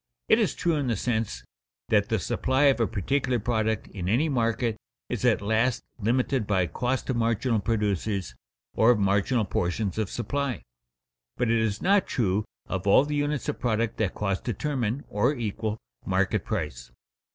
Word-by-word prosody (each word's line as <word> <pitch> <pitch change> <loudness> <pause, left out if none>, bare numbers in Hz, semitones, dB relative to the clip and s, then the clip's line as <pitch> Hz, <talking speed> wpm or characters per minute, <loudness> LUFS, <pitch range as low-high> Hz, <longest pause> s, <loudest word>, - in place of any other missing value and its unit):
It - - +5
is - - +1
true 170 -3 +1
in 140 -3 -1
the 115 - +1
sense 110 - -2 0.5
that 105 0 +3
the 110 - +2
supply 130 +7 0
of 140 -3 +5
a 115 - +2
particular 125 +7 0
product 110 -1 0
in 90 -3 -4
any 135 +10 +2
market 115 -3 0 0.3
is 125 -2 -3
at 115 -5 +3
last 110 +4 +1 0.2
limited 120 +1 +1
by 95 -3 +2
cost 125 +8 -2
of 125 - -1
marginal 115 0 +1
producers 100 - -1 0.4
or 110 - +4
of 120 - +5
marginal 100 +4 +2
portions 90 +2 -1
of 110 - -1
supply. 140 +1 -2 0.7
But 125 -2 +1
it 115 - +3
is 110 -2 -1
not 195 +1 +4
true 105 -3 0 0.2
of 95 0 -4
all 115 +8 +6
the 150 - -3
units 145 -1 -1
of - - -2
product 115 -2 0
that 105 -4 -1
costs 100 -2 -1
determine, 125 +1 -2
or 120 +8 +1
equal, 110 -2 -3 0.3
market 95 +1 0
price. 75 - -4
110 Hz, 170 wpm, -27 LUFS, 100-125 Hz, 0.7 s, all